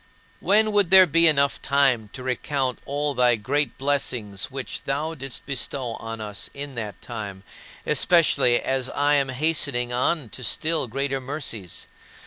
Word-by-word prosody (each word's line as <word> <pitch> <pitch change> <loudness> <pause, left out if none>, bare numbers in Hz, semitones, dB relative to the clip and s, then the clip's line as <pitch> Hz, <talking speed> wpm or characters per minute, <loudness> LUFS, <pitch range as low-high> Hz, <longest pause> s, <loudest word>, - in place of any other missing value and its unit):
When 215 +2 +3
would 205 -4 +2
there 190 0 +8
be 165 +1 +4
enough 140 -2 +2
time 135 -6 +2
to 130 - -7
recount 130 0 -1
all 145 +1 0
thy 125 -2 +4
great 135 +5 -1
blessings 125 -8 -1
which 135 -1 -6
thou 150 +4 -2
didst 135 -4 -7
bestow 130 -2 -3
on 115 0 -7
us 105 -2 -4
in 140 0 -5
that 110 -4 -5
time, 100 -5 -7 0.4
especially 160 -8 +3
as 130 -1 -1
I 145 +1 +1
am 140 -2 +2
hastening 130 -3 0
on 130 +1 0
to 125 - -8
still 155 +3 0
greater 135 +3 -2
mercies? 125 - -5
135 Hz, 150 wpm, -24 LUFS, 120-145 Hz, 0.4 s, there